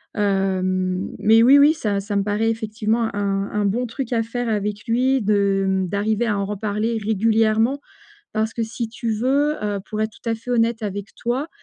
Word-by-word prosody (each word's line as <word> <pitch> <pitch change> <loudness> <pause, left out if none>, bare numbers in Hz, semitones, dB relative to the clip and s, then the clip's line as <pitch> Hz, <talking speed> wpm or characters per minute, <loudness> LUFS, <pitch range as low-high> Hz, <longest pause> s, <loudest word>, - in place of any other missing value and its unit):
hem, 185 -2 0
mais 225 +2 +5
oui 270 +4 +7
oui 290 +2 +6
ça 210 -10 -1
ça 205 +1 -4
me 200 - +1
paraît 210 +2 0
effectivement, 220 +1 -1
un 200 -1 -1
un 210 -1 0
bon 235 +5 0
truc 250 +1 -5
à 230 - +2
faire 240 +1 -3
avec 210 -1 -2
lui 255 +3 +2
de, 200 -2 +2
mmh, 190 -1 0
d'arriver 210 +4 0
à 210 -2 0
en 200 - -1
reparler 210 +3 -2
régulièrement. 220 +4 +2 0.6
Parce 220 0 0
que 230 - -1
si 225 +1 -4
tu 230 0 -4
veux, 275 +7 +1
heu, 205 -1 -2
pour 215 - -3
être 220 - -1
tout 230 - -8
à - - +1
fait 225 +2 -8
honnête 230 -1 +1
avec 205 0 -5
toi, 255 +6 -2
220 Hz, 195 wpm, -22 LUFS, 200-230 Hz, 0.6 s, oui